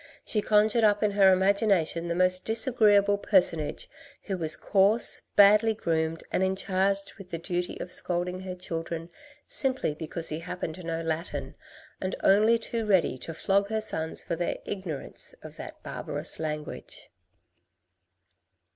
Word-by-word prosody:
She 210 - 0
conjured 215 +2 +3
up 210 0 +3
in 210 - +2
her 195 -1 +5
imagination 190 -3 +2
the 170 - -2
most 185 +1 +2
disagreeable 215 -4 +4
personage, 185 - +2 0.4
who 195 - -3
was 160 -3 -1
coarse, 205 +3 +2
badly 210 +2 +6
groomed 160 -4 -1
and - - 0
encharged 190 +1 0
with 190 -2 -11
the 170 - -4
duty 175 +1 -3
of 180 - -6
scolding 180 +1 -2
her 185 -1 -6
children 165 -1 -5 0.4
simply 260 - 0
because 160 +2 -1
he 155 - -3
happened 180 -1 -5
to 180 +2 -11
know 165 0 -3
Latin, 165 +1 -4 0.5
and 185 - -2
only 215 +4 +5
too 230 0 -4
ready 190 -10 +2
to 165 - -7
flog 200 +4 +1
her 220 +1 -1
sons 160 -7 -2
for 170 - -3
their 175 +1 -2
ignorance 180 -8 -6
of - - -11
that - - -10
barbarous - - -3
language. 150 -1 -6
185 Hz, 145 wpm, -27 LUFS, 165-205 Hz, 0.5 s, badly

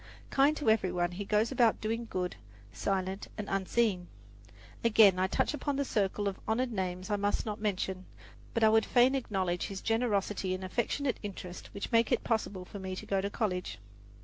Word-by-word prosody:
Kind 285 +3 +4
to 295 - -4
every 220 -4 +3
one, 175 0 0
he 185 +3 -5
goes 215 +4 +2
about 240 -4 +3
doing 230 +2 -2
good, 180 -1 -2 0.4
silent 190 - -2
and 210 -2 -4
unseen. 195 -1 0 0.8
Again 215 -5 +6
I 185 - +3
touch - - 0
upon 290 -1 -2
the 280 0 0
circle 205 -3 0
of 195 - -3
honoured 240 +3 0
names 185 -1 -3
I 205 - +2
must 205 0 0
not 210 0 -4
mention; 190 -2 -2 0.5
but 230 - +2
I 220 - +7
would 220 0 +5
fain 250 +2 +4
acknowledge 190 -9 -1
his 195 -1 -5
generosity 210 -4 0
and 185 - -7
affectionate 245 +6 -1
interest 185 -3 -7
which 200 - -6
make 230 -1 +3
it - - +2
possible 205 -5 -1
for 200 - -9
me 190 -1 -4
to - - -7
go 195 -1 0
to 200 - -2
college. 190 -4 -2
205 Hz, 190 wpm, -31 LUFS, 185-230 Hz, 0.8 s, I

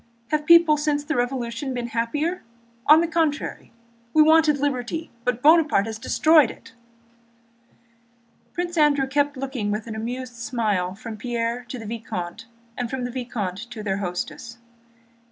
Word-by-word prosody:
Have 300 0 -1
people 335 -2 +7
since 295 -1 0
the 310 +1 -2
Revolution 245 +1 -2
become 240 -1 -3
happier? 290 +10 -1 0.5
On 305 +2 +8
the 335 - +1
contrary. 320 -3 -1 0.4
We 310 - +8
wanted 315 -1 +5
liberty, 285 +3 -2
but 250 0 -1
Buonaparte 310 -9 +5
has 220 -1 -6
destroyed 310 +5 +4
it." 260 - -13 1.8
Prince 345 -1 -2
Andrew 290 -2 +4
kept 285 +1 0
looking 260 -6 -3
with 210 +1 -2
an 225 -2 -6
amused 245 +3 -5
smile 210 -6 -1
from 220 +1 -8
Pierre 235 +1 -2
to 245 +2 -7
the 225 - -8
vicomte 215 -2 -6 0.3
and 245 -2 -3
from 260 0 -3
the 245 - -3
vicomte 235 -4 -4
to 225 -3 -7
their 195 -2 -1
hostess. 200 +5 -5
250 Hz, 150 wpm, -23 LUFS, 230-295 Hz, 1.8 s, On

